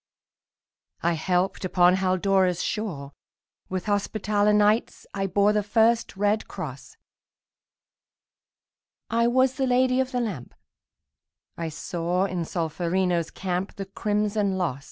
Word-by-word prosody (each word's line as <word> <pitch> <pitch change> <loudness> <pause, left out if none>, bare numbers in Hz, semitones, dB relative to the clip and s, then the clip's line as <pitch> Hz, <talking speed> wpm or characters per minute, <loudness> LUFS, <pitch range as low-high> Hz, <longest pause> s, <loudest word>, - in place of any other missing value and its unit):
I 170 +1 +2
helped 180 +4 0
upon 180 0 +4
Haldora's 185 -1 +1
shore; 165 -11 -4 0.6
With 185 -1 -3
Hospitaller 205 0 +1
Knights 210 +2 +2
I 195 -1 -1
bore 200 +2 +3
The 210 - +2
first 225 +1 +2
red 205 +2 +1
cross; - - -8 2.1
I 235 +1 +3
was 260 +1 +2
the 265 -1 +1
Lady 255 +1 +3
of 260 0 0
the 250 - -1
Lamp; 195 - -4 1.0
I 165 -1 -4
saw 175 +3 -2
in 175 -3 -3
Solferino's 170 +1 -1
camp 185 0 -3
The 195 - -5
crimson 205 0 -1
loss. 165 -8 -1
195 Hz, 115 wpm, -25 LUFS, 180-215 Hz, 2.1 s, upon